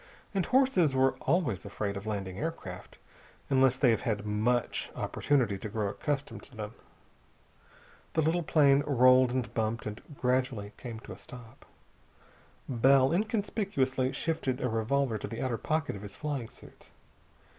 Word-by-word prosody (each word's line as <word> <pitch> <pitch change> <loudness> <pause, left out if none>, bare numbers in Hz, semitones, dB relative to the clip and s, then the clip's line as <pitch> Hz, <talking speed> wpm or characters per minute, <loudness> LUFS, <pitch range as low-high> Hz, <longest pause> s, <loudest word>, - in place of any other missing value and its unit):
And 195 -3 0
horses 255 - +3
are 130 0 +4 0.2
always 135 - +1
afraid 100 0 -3
of 100 +2 -6
landing 95 -3 -3
aircraft, 145 - -6 0.5
unless 130 -1 +4
they 130 -3 +4
have 110 - +1
had 105 -2 -2
much 110 +4 0
opportunity 120 -9 0
to 110 - -5
grow 105 -1 -1
accustomed 140 +6 -3
to 130 - -15
them. 105 0 -6 1.4
The 160 - +2
little 165 +3 +2
plane 145 -3 +4
rolled 130 -1 +6
and 125 -2 -2
bumped, 115 0 -1
and 105 0 -5 0.2
gradually 125 -5 0
came 115 -3 -7
to - - -11
a - - -13
stop. 120 -3 -13 1.0
Bell 130 +2 +4
inconspicuously 195 - 0
shifted 135 -3 -1
a 125 - -1
revolver 115 +1 0
to - - -5
the 115 - -6
outer 125 -3 -1
pocket 155 -5 -1
of 100 - -8
his 105 -1 -8
flying 140 -6 -4
suit. - - -15
130 Hz, 150 wpm, -30 LUFS, 110-145 Hz, 1.4 s, rolled